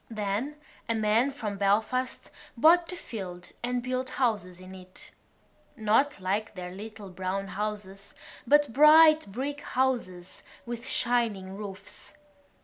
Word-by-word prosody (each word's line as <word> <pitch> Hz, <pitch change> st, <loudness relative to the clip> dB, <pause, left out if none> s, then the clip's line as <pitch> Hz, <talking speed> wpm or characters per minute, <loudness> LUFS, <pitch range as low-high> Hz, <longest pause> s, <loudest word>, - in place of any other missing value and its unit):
Then 215 Hz, +6 st, -3 dB, 0.3 s
a 230 Hz, -, +2 dB
man 220 Hz, +4 st, +2 dB
from 220 Hz, -7 st, -5 dB
Belfast 220 Hz, +6 st, 0 dB, 0.3 s
bought 335 Hz, +6 st, +5 dB
the 360 Hz, -, -5 dB
field 185 Hz, -, -8 dB
and 245 Hz, 0 st, -2 dB
built 255 Hz, +1 st, -2 dB
houses 205 Hz, -8 st, -1 dB
in 185 Hz, 0 st, -11 dB
it—not 215 Hz, +6 st, -3 dB
like 200 Hz, +4 st, -2 dB
their 180 Hz, -1 st, -6 dB
little 210 Hz, +1 st, -9 dB
brown 190 Hz, +2 st, -3 dB
houses 200 Hz, -1 st, -5 dB, 0.3 s
but 290 Hz, -2 st, +4 dB
bright 310 Hz, -2 st, +7 dB
brick 280 Hz, +6 st, -4 dB
houses 235 Hz, -11 st, -2 dB, 0.2 s
with 240 Hz, +1 st, -6 dB
shining 225 Hz, -7 st, 0 dB
roofs. 200 Hz, +3 st, -9 dB
215 Hz, 120 wpm, -28 LUFS, 195-255 Hz, 0.3 s, bright